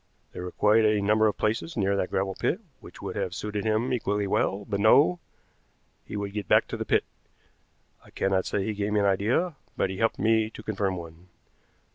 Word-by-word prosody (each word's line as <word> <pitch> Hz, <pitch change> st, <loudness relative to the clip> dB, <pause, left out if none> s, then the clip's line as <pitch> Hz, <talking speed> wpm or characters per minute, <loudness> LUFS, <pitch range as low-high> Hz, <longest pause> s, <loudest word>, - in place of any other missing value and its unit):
There -, -, -7 dB
were 90 Hz, 0 st, -5 dB
quite 110 Hz, +2 st, +3 dB
a 105 Hz, -1 st, +3 dB
number 105 Hz, +2 st, +3 dB
of 105 Hz, -, -1 dB
places 115 Hz, +9 st, -1 dB
near 100 Hz, -1 st, +1 dB
that 95 Hz, -2 st, -1 dB
gravel 95 Hz, 0 st, -1 dB
pit 175 Hz, -, -1 dB, 0.2 s
which -, -, -13 dB
would -, -, -5 dB
have 90 Hz, -, -2 dB
suited 105 Hz, +1 st, -4 dB
him 110 Hz, +4 st, +1 dB
equally 105 Hz, -3 st, 0 dB
well; 100 Hz, +1 st, 0 dB
but 100 Hz, -2 st, -2 dB
no, 140 Hz, -, +5 dB, 0.8 s
he -, -, -6 dB
would 100 Hz, -1 st, -4 dB
get 105 Hz, -3 st, -4 dB
back -, -, +4 dB
to -, -, -4 dB
the -, -, -4 dB
pit. -, -, +2 dB, 1.0 s
I -, -, -18 dB
cannot 95 Hz, -1 st, 0 dB
say 100 Hz, -, -1 dB
he 110 Hz, -, -2 dB
gave 105 Hz, 0 st, -2 dB
me 105 Hz, -, +3 dB
an -, -, +2 dB
idea, 110 Hz, -, +1 dB, 0.2 s
but 95 Hz, -, 0 dB
he 95 Hz, -, -6 dB
helped 115 Hz, 0 st, +2 dB
to 110 Hz, 0 st, +1 dB
confirm 100 Hz, -3 st, -1 dB
one. 85 Hz, 0 st, -10 dB
105 Hz, 205 wpm, -27 LUFS, 95-110 Hz, 1.0 s, no